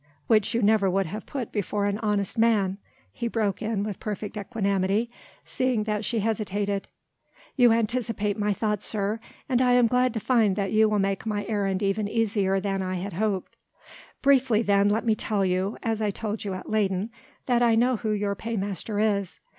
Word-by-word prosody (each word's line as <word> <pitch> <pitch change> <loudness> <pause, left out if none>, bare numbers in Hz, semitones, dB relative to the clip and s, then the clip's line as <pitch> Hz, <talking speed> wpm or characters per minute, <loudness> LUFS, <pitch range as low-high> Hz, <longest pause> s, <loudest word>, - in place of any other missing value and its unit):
"Which 215 -1 +2
you 235 - +1
never 205 -2 +4
would 195 +1 +1
have 210 +6 -7
put 260 -5 -4
before 205 0 -1
an 205 +1 -1
honest 205 -3 -1
man," 210 -4 +2 0.3
he 235 - -3
broke 215 -4 -1
in 220 -2 -1
with 210 -2 -5
perfect 210 0 -5
equanimity, 200 +1 0 0.3
seeing 255 -4 0
that 210 0 -2
she 225 +1 0
hesitated. 205 -2 -1 0.7
"You 245 -3 +6
anticipate 225 -2 0
my 210 0 0
thought, 210 0 -1
sir: 210 +1 -1 0.3
and 255 -3 +2
I 250 -1 +4
am 245 -1 +5
glad 250 +1 +2
to - - 0
find 220 -4 +2
that 195 -1 -1
you 220 0 +4
will 210 - +1
make 195 +1 -1
my 205 -1 -2
errand 200 -2 -1
even 200 +1 0
easier 205 -3 +1
than 195 0 -2
I 185 0 -2
had 185 +2 -4
hoped. 200 +1 -2 0.7
Briefly 265 -5 +4
then 200 -1 +3
let 220 +3 0
me 225 - +4
tell 210 -2 0
you 185 +3 0
as 225 -1 -1
I 210 - +1
told 210 +1 -4
you 195 -2 -2
at 185 - -8
Leyden 205 0 0 0.3
that 245 -2 +2
I 235 -2 +4
know 245 +2 +3
who 220 - -3
your 205 -1 0
paymaster 205 -1 -4
is. 205 -3 0
210 Hz, 190 wpm, -26 LUFS, 200-225 Hz, 0.7 s, You